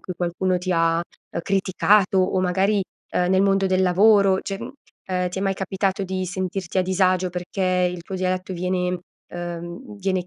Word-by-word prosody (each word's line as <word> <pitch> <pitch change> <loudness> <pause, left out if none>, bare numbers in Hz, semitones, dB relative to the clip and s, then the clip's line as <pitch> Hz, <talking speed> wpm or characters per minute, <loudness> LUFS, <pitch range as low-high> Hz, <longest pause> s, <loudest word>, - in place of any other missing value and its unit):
cui 185 - -6
qualcuno 180 +1 0
ti 185 +1 -4
ha, 165 -1 +2
uhm, 170 0 -7
criticato 195 +1 +2
o 185 0 +2
magari, 195 +3 +2 0.3
uhm, 180 0 +1
nel 190 0 +4
mondo 195 -1 +3
del 185 0 +2
lavoro, 195 +1 +5
cioè, 195 -1 -5
mhmm, - - -7 0.3
ehm, 180 -1 -1
ti 190 - -5
è 195 - -2
mai 195 -1 +1
capitato 195 +1 -1
di 185 0 -2
sentirti 185 0 -3
a - - +4
disagio 185 -1 +1
perché 180 0 0
il 175 -1 -7
tuo 190 - -7
dialetto 185 0 -2
viene 180 0 -1 0.3
uhm, 175 +5 -7
viene 185 -2 -1
185 Hz, 180 wpm, -23 LUFS, 180-195 Hz, 0.3 s, lavoro